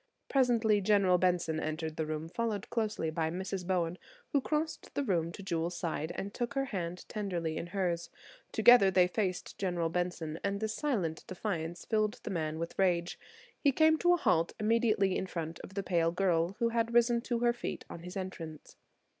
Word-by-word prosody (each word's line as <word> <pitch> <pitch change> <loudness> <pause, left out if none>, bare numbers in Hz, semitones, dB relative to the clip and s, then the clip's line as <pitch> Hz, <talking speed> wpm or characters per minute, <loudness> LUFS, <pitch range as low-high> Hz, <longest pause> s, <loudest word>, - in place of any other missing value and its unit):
Presently 230 -6 +3
General 195 -3 +4
Benson 175 -3 +1
entered 155 0 -3
the 160 -1 -2
room 155 +1 -3
closely 215 -3 -2
followed - - -12
by 160 -1 0
Mrs. 185 +1 -4
Bowen, 175 -2 0 0.3
who 280 - +3
crossed 310 +3 -2
the 285 - +1
room 170 -8 0
to 195 - -9
Jewel's 170 -1 -2
side 160 -1 -2
and 200 +1 -4
took 240 +3 -3
her 270 0 +1
hand 180 -6 -4
tenderly 175 -7 -2
in 165 - -4
hers. 175 -2 -1 0.4
Together 240 -5 +7
they 185 -1 +5
faced 185 0 -2
General 175 -4 0
Benson, 170 -2 -2
and 200 0 -1
this 220 0 -2
silent 210 - -1
defiance 175 -3 -4
filled 215 -1 0
the - - -4
man 160 -3 -2
with 165 +3 -5
rage. 175 -2 +1 0.4
He 285 - +4
came 315 +3 +4
to 350 0 +5
a - - -2
halt 165 - +2
immediately 215 -3 +2
in 190 - -2
front 165 -2 -5
of 190 - -11
the 200 - -1
pale 170 -3 +2
girl, 175 0 +1
who 235 -1 +2
had 230 0 0
risen 240 0 +4
to 240 -1 -1
her 240 0 +4
feet 240 - -5
on - - -8
his 180 +3 -7
entrance. 165 -5 -7
185 Hz, 190 wpm, -32 LUFS, 170-220 Hz, 0.4 s, Together